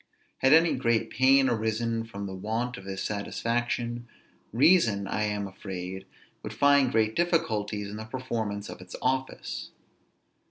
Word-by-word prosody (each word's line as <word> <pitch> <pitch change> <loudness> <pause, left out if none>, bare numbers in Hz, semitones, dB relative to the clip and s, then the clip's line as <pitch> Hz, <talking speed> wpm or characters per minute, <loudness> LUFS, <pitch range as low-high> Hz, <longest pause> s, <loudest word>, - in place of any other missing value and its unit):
Had 130 - +4
any 165 +2 +6
great 115 -3 +1
pain 135 +2 +5
arisen 115 0 -1
from 100 -3 -7
the 95 - -5
want 110 +6 -2
of 100 - -10
this 95 0 -4
satisfaction, 120 +3 -2 0.4
reason, 120 - +4
I 105 0 -1
am 105 -1 -2
afraid, 95 -1 -7 0.3
would - - -6
find 140 -3 +4
great 110 0 +2
difficulties 110 - 0
in 105 +1 -7
the 110 - -6
performance 110 -4 -4
of - - -9
its 90 - -9
office. 130 +1 -2
115 Hz, 145 wpm, -28 LUFS, 105-130 Hz, 0.4 s, any